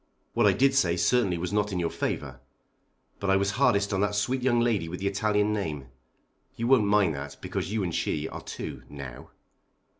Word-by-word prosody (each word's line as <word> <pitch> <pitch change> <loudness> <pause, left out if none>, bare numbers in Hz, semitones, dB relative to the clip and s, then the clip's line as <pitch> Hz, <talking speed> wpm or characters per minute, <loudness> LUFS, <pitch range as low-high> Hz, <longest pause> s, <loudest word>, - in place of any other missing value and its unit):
What - - +4
I - - +6
did 135 +1 +3
say 90 -11 +3
certainly 95 -1 +2
was 90 +3 -3
not 105 0 +1
in 95 - -2
your 85 -1 -1
favour. 65 -3 -3 0.8
But 100 - -2
I 95 - +5
was 100 +1 +1
hardest 100 -4 +2
on 95 - +1
that 105 0 +1
sweet 125 +6 0
young 120 -2 +2
lady 110 -8 +1
with 90 - -5
the 100 - -4
Italian 105 +1 +1
name. 75 -10 -3 0.7
You 115 - -3
won't 125 -4 +5
mind 100 -5 +3
that 70 0 -7
because - - -4
you 110 -2 0
and 85 -3 -2
she 75 -1 -1
are - - -7
two, - - -7
now." 70 -4 -9
100 Hz, 205 wpm, -27 LUFS, 85-110 Hz, 0.8 s, I